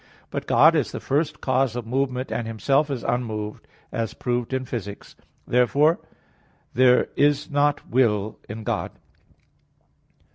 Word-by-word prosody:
But - - -4
God - - +6
is - - 0
the - - -5
first 150 +2 -1
cause 130 -2 +1
of 120 -2 -4
movement, 130 +1 -1
and 115 - -2
Himself 135 +7 +1
is 130 -4 -3
unmoved, 110 -4 -3 0.2
as 115 -1 -3
proved 120 -1 -2
in 130 0 -1
Phys. 120 -4 -4
viii, 100 0 -6
49. - - -16 0.3
Therefore 140 +7 +3 0.7
there 125 0 +4
is 145 +1 +2
not 145 0 +1
will 110 -4 +1
in 110 +1 -6
God. - - -2
125 Hz, 145 wpm, -24 LUFS, 115-140 Hz, 0.7 s, God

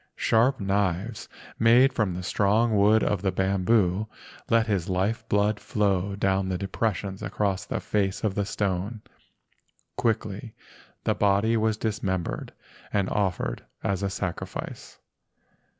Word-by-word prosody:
Sharp 120 +4 +2
knives 100 +2 -1 0.3
made 125 +4 +6
from 105 -8 0
the 90 - -5
strong 105 +4 +2
wood 105 +2 +5
of 100 -3 0
the 95 -1 +1
bamboo 95 +1 +2 0.4
let 115 0 +4
his 100 -6 -1
life 100 +5 0
blood 105 +1 +2
flow 100 -2 0
down 95 -1 +1
the 95 - -1
depressions 100 0 -2
across 100 -3 -1
the - - -3
face 100 -2 -1
of 105 -3 +1
the 100 - 0
stone. 100 +2 -2 0.9
Quickly 110 -1 -2 0.5
the - - +2
body 100 +3 +2
was 110 -1 +1
dismembered 95 -5 -2 0.4
and 100 -2 0
offered 95 -4 -1 0.2
as 100 -1 0
a 100 - 0
sacrifice. 95 -2 -5
100 Hz, 130 wpm, -26 LUFS, 95-110 Hz, 0.9 s, made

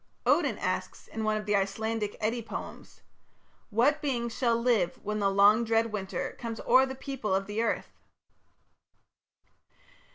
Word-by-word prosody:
Odin - - +3
asks - - -3
in 220 - -5
one 215 0 +1
of 210 - -5
the 210 -1 +1
Icelandic 210 +2 -1
Eddie 225 +2 -1
poems: 225 - -8 0.7
What 260 +8 +2
beings 235 -6 -2
shall 235 -3 +2
live 230 -6 +1
when 210 +1 -2
the 200 -1 +2
long 200 +3 +5
dread 225 0 +1
winter 195 -3 -3
Comes 230 -1 -5
o'er 260 +2 +5
the 265 - -6
people 260 -7 -2
of 195 0 -1
earth? 225 +3 -2
225 Hz, 140 wpm, -29 LUFS, 210-235 Hz, 0.7 s, long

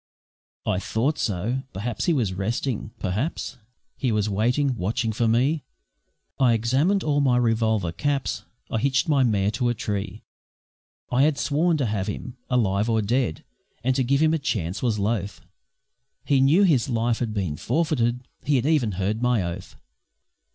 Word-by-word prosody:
I 90 - +1
thought 125 +9 -1
so. 110 +6 -1
Perhaps 110 +4 -3
he 170 - +3
was 115 -10 0
resting. 110 +5 -2
Perhaps 110 - -3 0.4
He 130 - -1
was 105 -1 +1
waiting, 125 +7 +1
watching 110 +3 -1
for 115 +2 0
me. 135 +7 +2 0.8
I 125 -3 +5
examined 135 - +2
all 145 -1 +2
my 130 -3 +3
revolver 110 -6 +1
caps, 140 - -1 0.3
I 110 - 0
hitched 135 +6 +1
my 145 -3 +3
mare 105 -5 +2
to 120 +2 0
a 120 - 0
tree 105 -1 -4 0.9
I 125 +1 +3
had 150 0 +3
sworn 155 +4 +1
to 140 - 0
have 105 -4 -1
him, 120 +4 -5
alive 105 -3 +1
or 110 -1 +2
dead, 110 - 0 0.4
And 130 +1 +2
to 130 - +2
give 140 +3 +2
him 160 0 +4
a 160 - +1
chance 105 - -2
was 115 -4 +1
loth. 105 -1 -2 0.8
He 140 -2 +3
knew 155 +9 +5
his 145 - +3
life 115 -1 0
had 120 -3 -1
been 95 -8 -2
forfeited 125 - 0 0.2
He 145 - +2
had 130 -1 +1
even 145 -9 +2
heard 100 +4 -1
of - - -8
my 125 -5 +2
oath. 85 +2 -6
120 Hz, 170 wpm, -24 LUFS, 105-135 Hz, 0.9 s, I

